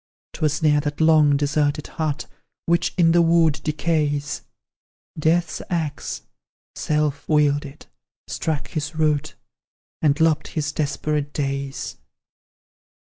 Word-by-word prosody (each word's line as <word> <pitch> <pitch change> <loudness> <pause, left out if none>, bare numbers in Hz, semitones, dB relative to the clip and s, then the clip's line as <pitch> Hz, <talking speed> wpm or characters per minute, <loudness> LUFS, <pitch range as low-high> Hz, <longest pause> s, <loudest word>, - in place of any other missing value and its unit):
'Twas 155 0 -1
near 150 -1 +4
that 145 0 -4
long 155 -3 +5
deserted 145 0 0
hut, 155 -2 -3 0.4
Which 170 +1 +2
in 165 -2 +5
the 170 +1 +5
wood 165 -2 +3
decays, 150 -2 -1 0.8
Death's 165 +3 +1
axe, 160 -5 -3 0.5
self 150 -2 -1
wielded, 145 -1 +1 0.4
struck 155 -3 -3
his 155 0 -4
root, 150 -2 0 0.7
And 150 -2 +2
lopped 160 -1 +2
his 145 -2 -2
desperate 150 0 -2
days. 140 -1 -3
150 Hz, 105 wpm, -23 LUFS, 145-160 Hz, 0.8 s, long